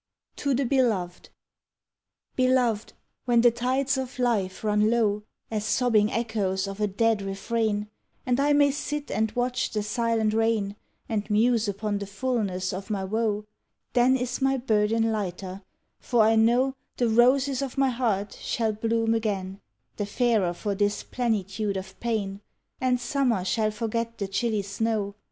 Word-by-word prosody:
TO 280 -2 0
THE 270 +2 +1
BELOVED 225 -9 0 1.1
Beloved, 255 -4 +2 0.3
when 240 -1 +4
the 240 0 +6
tides 260 +3 0
of 260 -1 -5
life 220 -7 0
run 210 0 +3
low 215 -3 +2 0.3
As 215 -2 -1
sobbing 215 -2 +2
echoes 205 -4 -1
of 195 +1 -6
a 210 - +3
dead 220 +2 +1
refrain, 210 +2 -1 0.4
And 250 +1 +1
I 290 +1 +3
may 285 -1 +5
sit 295 +1 -4
and 220 +1 0
watch 250 +1 0
the 210 -1 -2
silent 225 0 0
rain 220 -3 +1 0.3
And 215 -2 -2
muse 225 +1 +3
upon 205 +1 -2
the 200 - -5
fulness 200 -4 -2
of 190 +3 -6
my 200 -3 -1
woe, 210 +1 -1 0.5
Then 250 +1 +4
is 250 +1 -3
my 270 0 +2
burden 225 -1 +1
lighter, 190 -2 -4 0.4
for 235 -3 +2
I 220 +1 +4
know 240 +4 +3 0.2
The 240 - +2
roses 255 +4 +3
of 275 -2 -4
my 270 -1 +3
heart 225 -5 -1
shall 225 -2 0
bloom 225 +1 0
again 200 -4 -2 0.4
The 205 - -2
fairer 210 -6 +1
for 205 +2 -2
this 205 +1 0
plenitude 210 -4 -1
of 190 0 -8
pain, 205 -4 -2 0.4
And 255 -1 +1
Summer 240 -6 0
shall 215 +2 +1
forget 230 +1 -3
the 200 - -3
chilly 215 +1 -1
snow. 205 0 -1
225 Hz, 155 wpm, -26 LUFS, 205-245 Hz, 1.1 s, the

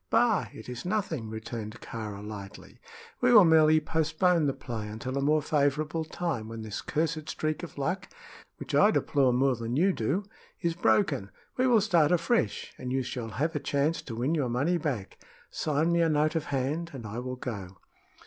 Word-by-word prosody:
"Bah! 220 - +3
it 110 - -11
is 125 -1 -6
nothing," 175 - -2
returned 110 0 -6
Kāra, 105 -3 -6
lightly. 100 -2 -9 0.4
"We 250 0 +4
will 210 -6 +9
merely 155 -1 +6
postpone 160 +1 +1
the - - +2
play 115 -5 -6
until 115 +5 -5
a 140 - 0
more 150 +2 +2
favorable 150 +2 0
time, 155 -8 -3
when 115 0 -7
this 110 -2 -5
cursed 155 0 -2
streak 155 -1 -2
of 175 - -9
luck 180 +8 -2 0.5
which - - -7
I 205 - +6
deplore 140 -10 +2
more 130 +1 +2
than 115 +1 -3
you 185 +6 +3
do 150 - -1 0.4
is 170 -2 0
broken. 110 - +1 0.3
We 255 0 +2
will 235 -4 +5
start 170 -6 +3
afresh, 175 +7 +1
and 125 -1 -4
you 130 0 0
shall 120 -2 -5
have 150 +10 -2
a - - +1
chance 145 +3 0
to 115 - -7
win 125 +7 0
your 145 -6 0
money 145 +9 +1
back. 135 -11 -4 0.3
Sign 155 +2 0
me 170 0 +3
a 165 - +3
note 155 0 +2
of 165 -1 -1
hand 145 +4 -2
and 120 -4 -7
I 110 +3 -5
will 125 +1 -4
go." 100 -8 -6
145 Hz, 190 wpm, -28 LUFS, 120-165 Hz, 0.5 s, will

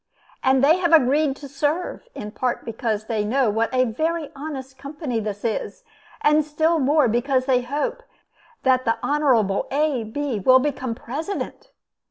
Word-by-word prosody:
And 265 0 +3
they 310 +5 +6
have 345 -2 +1
agreed 290 -1 +4
to 280 - -10
serve, 295 - -2
in 210 - -6
part 250 +2 -2
because 220 -2 -2
they 220 -2 -1
know 240 +1 +1
what 225 +2 0
a 255 -1 +3
very 315 +6 -2
honest 270 -2 -7
company 280 -4 -4
this 210 -1 -5
is, 230 - -3 0.4
and 300 +1 +4
still 315 +2 +1
more 285 0 +3
because 255 +3 +1
they 255 -2 +3
hope 280 +4 -3 0.6
that 255 -1 +3
the 230 -2 +1
Honorable 250 -10 +2
A. 285 -3 +1
Bee 245 +1 -3
will 255 +7 +6
become 260 -3 -2
President. 310 - -5
265 Hz, 160 wpm, -23 LUFS, 235-295 Hz, 0.6 s, they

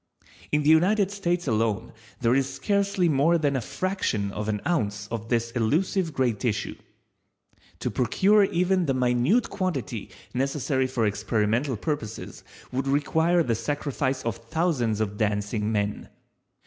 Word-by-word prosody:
In 150 0 +2
the 145 - +3
United 195 +5 +4
States 175 -4 -1
alone 110 -2 0 0.3
there 120 0 +3
is 135 0 +1
scarcely 200 -3 +1
more 155 +3 +3
than 145 -3 +1
a 130 - 0
fraction 115 - -2
of 105 +1 -4
an 105 -1 0
ounce 105 -12 -1
of 115 -1 -4
this 115 -1 0
elusive 160 - +1
gray 130 -4 +1
tissue. 110 0 -2 1.1
To - - -1
procure 195 - +3
even 180 -1 +1
the 135 - +1
minute 125 - +2
quantity 145 - -3 0.2
necessary 135 0 0
for 125 -3 0
experimental 110 +5 0
purposes 115 -4 -5 0.3
would 130 +1 -2
require 160 +5 +2
the 120 - 0
sacrifice 135 +2 -2
of 115 -4 -1
thousands 120 -5 0
of 105 -1 -2
Dancing 105 0 -1
men. 105 -1 -2
130 Hz, 140 wpm, -26 LUFS, 110-170 Hz, 1.1 s, United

